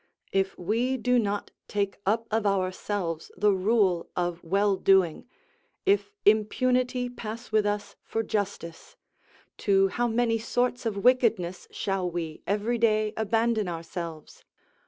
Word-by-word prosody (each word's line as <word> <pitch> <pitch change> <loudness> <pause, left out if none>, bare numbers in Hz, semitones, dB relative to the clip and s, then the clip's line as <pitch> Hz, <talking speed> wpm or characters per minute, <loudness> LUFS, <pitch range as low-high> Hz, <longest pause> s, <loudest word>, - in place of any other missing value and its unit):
If 195 0 0
we 230 +8 0
do 250 +1 +2
not 205 -2 -2 0.2
take 200 -1 -1
up 225 +3 +2
of 220 -1 +1
ourselves 185 -3 -2
the 210 0 +4
rule 190 -3 +2
of 175 -1 -2
well 195 +3 +2
doing, 190 -1 +3 0.6
if 405 +1 +2
impunity 250 +4 +2
pass 235 -1 -7
with 215 -1 +3
us 205 0 -3
for 225 - -2
justice, 200 -6 -4 0.6
to 195 -2 +3
how 240 +5 0
many 230 0 +1
sorts 245 +1 -1
of 210 -3 -2
wickedness 225 -8 +2
shall 195 -2 -2
we 165 -2 -5
every 210 +4 0
day 215 -2 +2
abandon 220 -1 +1
ourselves? 165 -2 -6
210 Hz, 130 wpm, -27 LUFS, 185-230 Hz, 0.6 s, the